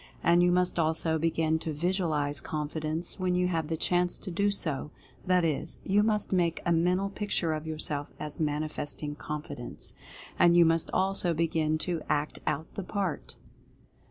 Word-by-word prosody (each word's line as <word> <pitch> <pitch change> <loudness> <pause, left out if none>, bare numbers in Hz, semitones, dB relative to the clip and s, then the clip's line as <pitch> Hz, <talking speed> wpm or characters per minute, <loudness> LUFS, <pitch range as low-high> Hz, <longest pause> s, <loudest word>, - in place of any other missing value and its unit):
And 170 +1 +5
you 175 0 +4
must 180 -1 +2
also 160 0 +2
begin 160 0 +1
to 160 - -4
Visualize 155 -3 0
"Confidence" 155 +3 -3
when 180 -1 +1
you 180 0 +2
have 165 -3 -1
the 160 0 -2
chance 175 +2 +2
to 190 - -7
do 200 +4 +2
so 155 -8 0 0.2
— - - -26
that 180 -2 +4
is, 155 -3 -2
you 200 +2 +3
must 210 -2 +1
make 170 -2 +2
a 175 - +2
Mental 180 +4 +2
Picture 195 -5 -1
of 155 +1 -4
yourself 150 -2 -3
as 150 -1 -4
manifesting 150 -1 -2
Confidence. 150 -4 -6 0.5
And 175 0 +6
you 170 - +8
must 165 0 +2
also 190 -3 +1
begin 155 -1 +1
to 170 -3 -2
ACT 150 +1 0
OUT 160 +3 -2
THE - - -4
PART. 190 -2 -3
165 Hz, 170 wpm, -29 LUFS, 155-180 Hz, 0.5 s, you